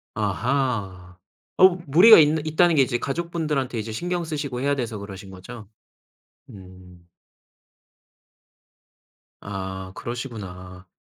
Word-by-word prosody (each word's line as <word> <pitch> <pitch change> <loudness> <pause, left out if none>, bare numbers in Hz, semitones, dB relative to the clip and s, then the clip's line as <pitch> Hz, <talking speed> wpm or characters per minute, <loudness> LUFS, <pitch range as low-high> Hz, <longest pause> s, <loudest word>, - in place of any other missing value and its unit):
아하. 105 -4 -2 0.4
어 185 - +8 0.2
무리가 180 +11 +8
있는 155 0 +3
있다는 165 +2 +3
게 140 - +5
이제 120 -1 -1
가족분들한테 150 -4 -3
이제 110 +1 -5
신경 175 +8 -3
쓰시고 145 -5 -4
해야 140 +1 +1
돼서 115 -5 -4
그러신 100 -1 -10
거죠? 100 +3 -11 0.8
음. 90 -2 -14 2.4
아 95 -1 -6
그러시구나. 95 -7 -8
120 Hz, 235 characters per minute, -23 LUFS, 95-150 Hz, 2.4 s, 어